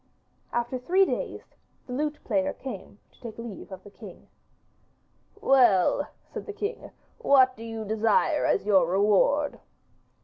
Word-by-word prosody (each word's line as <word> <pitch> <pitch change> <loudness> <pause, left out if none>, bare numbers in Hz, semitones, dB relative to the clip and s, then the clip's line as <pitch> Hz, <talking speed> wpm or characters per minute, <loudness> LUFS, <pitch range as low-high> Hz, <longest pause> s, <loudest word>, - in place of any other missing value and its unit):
After 240 +2 -2
three 370 +9 +3
days - - -5 0.3
the 250 - -7
lute 300 +3 -2
player 285 0 0
came 210 -7 -9
to - - -27
take 230 -3 -8
leave 230 -4 -8
of 190 0 -9
the 205 - -14
king. - - -13 1.1
'Well,' 245 - +4 0.2
said - - -9
the 420 - -5
king, 415 +3 -5 0.3
'what 260 -2 +4
do 225 - -10
you 225 -1 -6
desire 220 - +2
as - - +1
your 190 -5 +4
reward? 210 - +2
240 Hz, 140 wpm, -26 LUFS, 210-285 Hz, 1.1 s, Well